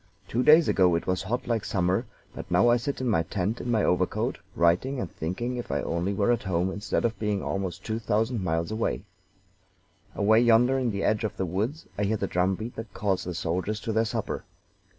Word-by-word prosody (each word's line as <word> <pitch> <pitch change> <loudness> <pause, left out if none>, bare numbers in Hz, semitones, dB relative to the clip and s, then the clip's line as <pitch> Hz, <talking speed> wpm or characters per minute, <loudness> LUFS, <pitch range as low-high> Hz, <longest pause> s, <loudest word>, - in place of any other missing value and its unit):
Two 120 - 0
days 155 +4 +7
ago 90 -3 +4
it 85 - -2
was 90 0 0
hot 115 +6 -2
like 115 -3 0
summer, 90 0 0 0.3
but - - -8
now 120 - +4
I 120 - +5
sit 135 +3 -3
in 130 - -1
my 95 -8 +3
tent 95 +7 -2
in 125 - -5
my 110 -3 +2
overcoat, 90 0 0 0.2
writing, 90 +11 +2
and 95 - -4
thinking 120 +10 -3
if 120 - -5
I - - 0
only 85 +4 -1
were 100 +3 +2
at 120 -1 +1
home 90 -1 0
instead 105 +4 -1
of 115 -3 -1
being 105 -2 -1
almost 95 -1 -3
two 110 0 -2
thousand 110 0 0
miles 85 +1 -1
away. 110 +1 -1 1.1
"Away 110 +2 +4
yonder, 120 +3 +4
in 125 -2 0
the 100 -2 -2
edge 110 +1 +1
of 110 - -3
the 95 - -1
woods, 105 - -2
I 105 - +2
hear 110 +2 +1
the 100 - -1
drum 95 +1 +1
beat 110 +5 -7
that 115 -1 -6
calls 95 -3 0
the 90 -1 -4
soldiers 90 +5 -2
to 115 -1 -3
their 110 +1 +2
supper. 110 - -3
105 Hz, 220 wpm, -27 LUFS, 90-115 Hz, 1.1 s, days